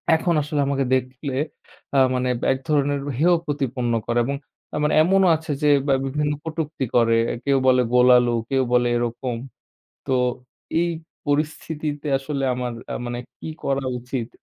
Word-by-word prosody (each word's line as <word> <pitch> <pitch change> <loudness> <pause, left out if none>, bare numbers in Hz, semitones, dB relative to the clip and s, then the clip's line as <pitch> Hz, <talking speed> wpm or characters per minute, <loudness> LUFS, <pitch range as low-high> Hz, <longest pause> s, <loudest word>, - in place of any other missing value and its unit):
এখন 170 +1 +1
আসলে 150 0 -2
আমাকে 135 -1 0
দেখলে 130 +2 -3 0.6
আ - - +4 0.2
মানে 125 0 0 0.2
এক 130 - 0
ধরনের 145 -1 +2 0.2
হেয় 175 +3 +4
প্রতিপন্ন 130 -5 -1
করে 120 0 +1
এবং 140 +1 -1 0.4
আমার 150 0 +1
এমনও 190 +2 +4
আছে 160 -1 -5
যে 150 - +5 0.2
বা 135 - +4
বিভিন্ন 150 +2 -1
কটুক্তি 155 -4 -3
করে। 115 -1 +4 0.3
কেউ 140 -1 +3
বলে 130 -1 +5
"গোল 125 0 +6
আলু", 120 -1 +2 0.2
কেউ 135 -1 +2
বলে 120 0 +4
এরকম। 120 +1 -2 0.7
তো, 135 - -1 0.7
এই 170 0 +1 0.4
পরিস্থিতিতে 150 0 -2
আসলে 140 0 -4
আমার 125 -1 -3 0.2
আ - - -2
মানে 120 0 -3 0.2
কি - - -7 0.2
করা 135 0 0
উচিত? 125 -1 -4
140 Hz, 155 wpm, -23 LUFS, 125-150 Hz, 0.7 s, গোল